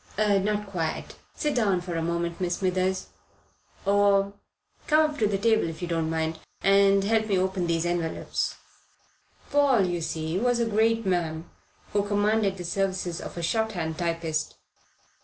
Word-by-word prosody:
"Not 210 0 +1
quite. 165 -5 -3 0.2
Sit 300 -1 -1
down 205 -7 +2
for 175 0 -6
a 165 - -1
minute, 170 +1 -2
Miss 175 -1 0
Smithers. 185 0 0 0.8
Or, 200 0 +3 0.5
come 310 0 +5
up 295 - -9
to 215 - +3
the 200 -1 0
table 220 -3 +2
if 160 - -8
you 175 - -3
don't 165 -2 -1
mind, 160 0 -2 0.2
and 195 0 +5
help 220 +1 +1
me 200 -3 +2
open 185 -1 0
these 165 0 0
envelopes." 175 -2 -2 1.0
Paul, 275 -8 +4
you 175 -1 -2
see, 160 +2 -2
was 245 +1 +2
a 235 - +2
great 225 +1 +2
man, 170 -3 -1 0.5
who 205 - +3
commanded 205 0 +1
the 180 - -6
services 185 -1 -1
of - - -8
a 170 - -3
shorthand 175 -5 -1
typist. 165 -2 -2
190 Hz, 160 wpm, -26 LUFS, 170-210 Hz, 1.0 s, come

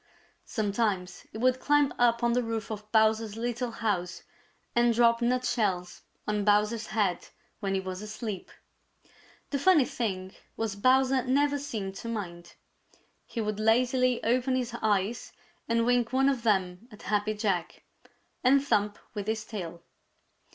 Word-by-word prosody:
Sometimes 200 -4 -1
he - - -8
would 255 +2 +2
climb 290 -1 +3
up 235 0 +3
on 235 0 +3
the 250 - +2
roof 225 -2 -4
of 210 0 -7
Bowser's 220 -1 +2
little 240 +1 -2
house 200 -6 -2 0.5
and 240 -1 +4
drop 235 0 +4
nutshells 235 -7 0 0.3
on 210 -1 0
Bowser's 210 +2 +2
head 205 -5 0 0.3
when 195 -2 -1
he - - +1
was 185 0 -5
asleep. 215 -2 -6 1.0
The 280 - 0
funny 315 -3 +5
thing 190 -7 -3 0.2
was 225 -3 -2
Bowser 260 +4 +3
never 285 +2 +2
seemed 215 -9 -4
to - - -7
mind. 175 -6 -6 0.7
He 230 - -4
would 210 -1 -2
lazily 250 +3 +2
open 255 +3 +1
his 250 -2 -2
eyes 210 +2 0 0.4
and 230 0 +2
wink 245 -1 +2
one 270 +1 +3
of 265 -4 -1
them 190 -2 0
at 210 - -13
Happy 210 +1 0
Jack 195 -5 -2 0.6
and 270 +2 +4
thump 210 -6 +1 0.2
with 205 -1 -5
his 220 0 -2
tail. 175 -5 -7
225 Hz, 145 wpm, -28 LUFS, 205-245 Hz, 1.0 s, funny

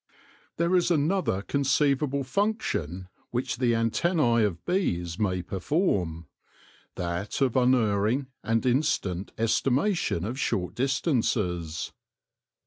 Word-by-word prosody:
There 170 +2 +2
is 180 -1 +3
another 160 - +1
conceivable 140 +1 +1
function 130 - -1 0.2
which 125 +1 -2
the 120 -2 +2
antennae 120 +1 +2
of 90 -5 -2
bees 85 - -1
may 90 -4 0
perform 90 - -1 0.3
— - - -26 0.3
that 85 +3 -3
of 135 -4 +1
unerring 125 -1 +2 0.2
and 115 +2 0
instant 100 - 0
estimation 130 - +1
of 120 +5 -4
short 90 -8 -1
distances. 110 - -1
120 Hz, 105 wpm, -27 LUFS, 95-140 Hz, 0.3 s, is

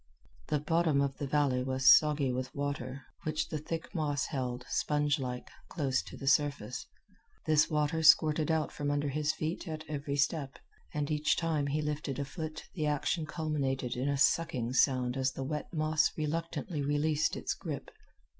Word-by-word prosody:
The 150 - +1
bottom 160 0 +2
of 140 -1 -1
the 140 - -2
valley 135 -3 +2
was 130 0 +6
soggy 150 -3 +2
with 130 +1 -4
water, 140 -2 -3 0.2
which 155 -2 -2
the 155 - -3
thick 165 +3 -5
moss 145 -5 0
held, 125 -2 -3
spongelike, 145 -4 0 0.2
close 135 -6 0
to - - -11
the 135 - -7
surface. 135 -4 +1 0.6
This 155 -1 +4
water 150 +1 +1
squirted 155 -1 +5
out 160 -1 +1
from 145 -1 -3
under 145 0 0
his 150 +2 0
feet 160 +4 -4
at 155 -1 -5
every 145 -1 -3
step, 145 -1 0 0.3
and 150 0 -2
each 150 0 +2
time 160 -4 0
he 150 +2 -1
lifted 150 -2 -3
a 140 - -2
foot 155 +1 -6
the 155 -4 -1
action 150 +2 0
culminated 140 -5 -2
in 130 +3 -1
a 140 - +1
sucking 130 -5 +2
sound 130 -2 +3
as 130 0 +1
the 135 - -4
wet 150 +2 -4
moss 155 -1 +2
reluctantly 165 +1 -2
released 145 +2 +1
its - - -2
grip. - - -6
145 Hz, 170 wpm, -31 LUFS, 135-155 Hz, 0.6 s, was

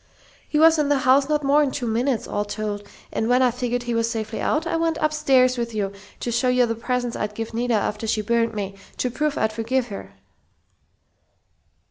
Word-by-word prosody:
"He 300 - 0
was 320 +1 +6
in 290 -1 +1
the 290 - +3
house 270 +2 +4
not 300 -1 +1
more'n 285 +1 +4
two 260 -1 -4
minutes, 235 +2 0
all 205 - -1
told, 205 0 -4 0.3
and 225 - -1
when 250 +1 +4
I 250 - +4
figured 245 0 -2
he 240 -1 -2
was 230 0 +1
safely 220 -2 -4
out, 310 +2 0
I 330 - -1
went 330 -1 0
upstairs 270 -5 +3
with 235 -1 -3
you 200 -2 -1 0.3
to 240 - -2
show 235 +2 +1
you 250 0 +4
the 230 - -1
presents 245 +1 -2
I'd 210 0 -3
give 225 +1 -5
Nita 240 0 0
after 210 +1 -1
she 215 0 0
burnt 230 +1 +1
me, 195 -2 -3 0.2
to 250 - -1
prove 300 +3 -1
I'd 220 0 0
forgive 235 +3 -1
her." 100 - -8
240 Hz, 205 wpm, -23 LUFS, 220-275 Hz, 0.3 s, was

